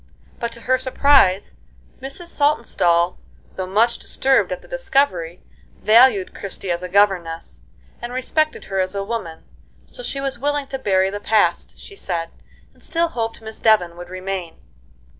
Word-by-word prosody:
But, 235 -1 -3
to 235 - -8
her 255 +2 +1
surprise, 260 -7 +3 0.5
Mrs. 275 +6 -8
Saltonstall, 180 - +1 0.4
though 185 -1 -4
much 225 +5 +2
disturbed 265 0 +1
at - - -5
the - - -16
discovery, 270 - 0 0.4
valued 220 -3 +5
Christie 195 -1 -5
as 170 0 -1
a 180 - -6
governess, 180 -4 +1 0.4
and 240 0 -5
respected 305 +5 -1
her 195 - -3
as 185 +1 -1
a 200 - -1
woman, 195 -7 -5 0.4
so - - -9
she 280 - -3
was 275 -3 -3
willing 290 +1 -1
to 270 - -4
bury 190 -4 +2
the 205 - -4
past, 215 +1 +1
she 400 - -12
said, 170 - -4 0.4
and - - -25
still 335 0 0
hoped 225 -5 -4
Miss 220 0 -7
Devon 195 -6 +3
would 175 0 -10
remain. 185 -2 -5
215 Hz, 160 wpm, -21 LUFS, 185-265 Hz, 0.5 s, valued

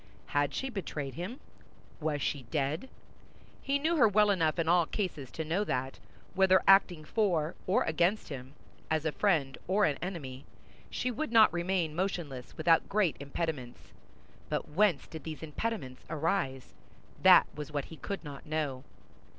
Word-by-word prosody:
Had 145 0 +1
she 265 0 -3
betrayed 150 - -4
him? 185 - -6 0.6
Was 150 -2 -1
she 145 - -1
dead? 150 - -1 0.7
He 275 +1 +1
knew 320 +4 +1
her 255 - +6
well 210 0 +4
enough 165 -5 +1
in 165 -1 0
all 170 -1 +4
cases 160 - -3
to 160 +7 -5
know 170 +6 0
that, 130 -8 -3 0.3
whether 190 0 +4
acting 185 -5 +5
for 170 -5 +1
or 185 - +3
against 175 +6 +1
him, 135 -1 -8 0.3
as 160 0 0
a 160 - +1
friend 150 -8 +1
or 200 +3 +3
an 145 - 0
enemy, 145 -8 -5 0.5
she 250 - -2
would 275 +3 -3
not 220 -6 +6
remain 175 -2 0
motionless 170 -8 -3
without 165 +1 +3
great 200 -5 +2
impediments; 140 -3 -5 0.6
but - - -2
whence 175 -1 +2
did 160 - -9
these 160 -1 -7
impediments 155 - -4
arise? 155 -5 -1 0.5
That - - +8
was 150 0 -7
what 145 -2 -2
he 160 - -11
could 200 +3 -5
not 145 -2 -9
know. 150 -4 -2
160 Hz, 160 wpm, -31 LUFS, 145-195 Hz, 0.7 s, That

